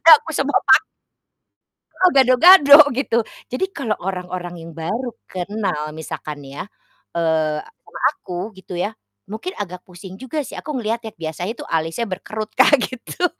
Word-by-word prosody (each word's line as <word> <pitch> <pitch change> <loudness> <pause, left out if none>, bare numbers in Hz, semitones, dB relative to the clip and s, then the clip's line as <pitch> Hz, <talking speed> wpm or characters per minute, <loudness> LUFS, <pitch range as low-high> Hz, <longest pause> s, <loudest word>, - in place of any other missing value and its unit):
jadi 330 - +2
aku - - -15
sema 275 +1 0
pak - - +6 1.2
Heeh, 370 -1 +4
gado-gado, 280 +4 +8 0.2
gitu. 245 -2 0 0.3
Jadi 255 +9 0
kalo 235 -6 -2
orang-orang 180 -1 -5
yang 165 0 -10
baru 225 +10 -3 0.2
kenal, 185 -5 -3
misalkan 155 -1 -6
nih 135 - -11
ya, - - -4 0.5
eee, 160 -2 +1
sama - - -14
aku, 180 +5 -6
gitu 190 -1 -10
ya, 205 +5 -2 0.3
mungkin 225 - -6
agak 180 -3 -6
pusing 180 +1 -11
juga 295 +4 -3
sih. - - -10
Aku - - -10
ngelihatnya 225 0 -3
biasanya 165 +5 -4
itu - - -8
alisnya 165 +7 -1
berkerut, 215 +3 -6
Kak, 275 +3 +6
gitu. 255 +8 -4
205 Hz, 150 wpm, -20 LUFS, 175-255 Hz, 1.2 s, gado-gado